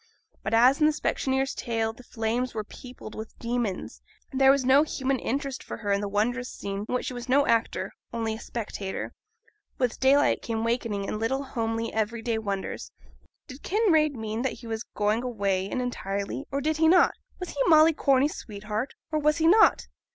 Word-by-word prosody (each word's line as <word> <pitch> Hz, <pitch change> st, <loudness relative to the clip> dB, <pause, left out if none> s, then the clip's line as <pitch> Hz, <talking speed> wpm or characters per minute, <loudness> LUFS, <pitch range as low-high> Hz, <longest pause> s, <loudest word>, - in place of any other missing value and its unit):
But, -, -, 0 dB
as 250 Hz, +5 st, +5 dB
in 305 Hz, -, +5 dB
the 310 Hz, -, +3 dB
specksioneer's 270 Hz, -2 st, 0 dB
tale 225 Hz, -1 st, -2 dB
the 240 Hz, -, -14 dB
flames 240 Hz, +1 st, -2 dB
were 215 Hz, -, -2 dB
peopled 245 Hz, 0 st, -11 dB
with 220 Hz, 0 st, -8 dB
demons, 235 Hz, -5 st, -3 dB, 0.3 s
there 265 Hz, 0 st, +5 dB
was 270 Hz, -1 st, +4 dB
no 265 Hz, +3 st, +6 dB
human 270 Hz, -3 st, -1 dB
interest 275 Hz, +1 st, -3 dB
for -, -, -7 dB
her 205 Hz, -3 st, -3 dB
in 200 Hz, 0 st, +2 dB
the 205 Hz, -, -3 dB
wondrous 245 Hz, +5 st, 0 dB
scene 200 Hz, +1 st, -5 dB
in -, -, 0 dB
which 250 Hz, -, -1 dB
she -, -, -3 dB
was 245 Hz, 0 st, -7 dB
no 280 Hz, +2 st, +4 dB
actor, 230 Hz, -1 st, 0 dB, 0.2 s
only 225 Hz, -1 st, -2 dB
a 220 Hz, -, -6 dB
spectator. 205 Hz, -4 st, -5 dB, 0.6 s
With 250 Hz, -3 st, -1 dB
daylight 275 Hz, +2 st, +4 dB
came 225 Hz, -1 st, -2 dB
wakening 230 Hz, -4 st, -1 dB
and 215 Hz, -, -3 dB
little 265 Hz, +5 st, 0 dB
homely 230 Hz, -3 st, -2 dB
every 220 Hz, +1 st, -1 dB
day 230 Hz, -2 st, 0 dB
wonders. 200 Hz, -3 st, -4 dB, 0.5 s
Did 265 Hz, 0 st, -11 dB
Kinraid 330 Hz, -8 st, +2 dB
mean 220 Hz, 0 st, -3 dB
that 265 Hz, -, -1 dB
he 240 Hz, -, -12 dB
was 225 Hz, -1 st, -3 dB
going 210 Hz, +2 st, +1 dB
away 200 Hz, -6 st, 0 dB
really 195 Hz, -, -8 dB
and 250 Hz, -, -1 dB
entirely, 200 Hz, +1 st, -3 dB
or 280 Hz, 0 st, -1 dB
did 310 Hz, +2 st, 0 dB
he 320 Hz, 0 st, +4 dB
not? 355 Hz, +2 st, +5 dB, 0.3 s
Was 360 Hz, -, -5 dB
he 285 Hz, -, -3 dB
Molly 320 Hz, 0 st, +7 dB
Corney's 275 Hz, 0 st, +2 dB
sweetheart, 210 Hz, +4 st, -5 dB, 0.2 s
or 310 Hz, -, +1 dB
was 300 Hz, +1 st, +2 dB
he 325 Hz, -, +1 dB
not? 425 Hz, +6 st, +5 dB
245 Hz, 195 wpm, -27 LUFS, 220-275 Hz, 0.6 s, Molly